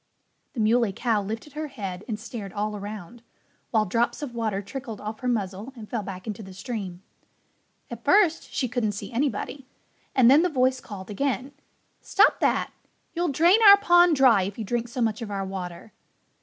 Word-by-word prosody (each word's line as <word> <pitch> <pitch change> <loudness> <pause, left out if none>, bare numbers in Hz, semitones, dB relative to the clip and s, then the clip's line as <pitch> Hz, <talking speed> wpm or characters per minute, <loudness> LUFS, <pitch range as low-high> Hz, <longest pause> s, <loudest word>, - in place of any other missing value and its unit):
The 245 - -6
Muley 220 -1 +2
Cow 225 -1 0
lifted 225 +8 -6
her 305 +1 -4
head 195 -8 -6
and 215 -3 -3
stared 215 -3 -7
all 210 0 -2
around, 205 +2 -8 0.5
while 220 -2 +2
drops 235 +8 0
of 260 -5 -5
water 220 -4 -1
trickled 225 +1 -7
off 215 +3 -6
her 250 - -4
muzzle 210 +1 -2
and 220 -3 -10
fell 230 -1 -3
back 190 -2 -8
into 215 -1 -5
the 190 -2 -11
stream. 195 -4 -6 0.9
At - - -8
first 365 -6 +3
she 255 - -1
couldn't 235 -3 -1
see 205 - -7
anybody. 265 +1 -2 0.5
And 260 - +5
then 280 +5 +7
the 360 - +2
voice 260 -3 +1
called 200 -4 -9
again, 270 +4 -2 0.5
"Stop - - +3
that! - - +1 0.4
You'll 345 0 0
drain 340 +9 +4
our 400 0 +11
pond 350 -4 +5
dry 260 -7 +5
if 195 +2 -4
you 220 - -4
drink 240 +3 -2
so 240 +1 -5
much 225 0 0
of 225 - -5
our 195 -1 -3
water." 185 +1 -7
225 Hz, 185 wpm, -25 LUFS, 205-260 Hz, 0.9 s, our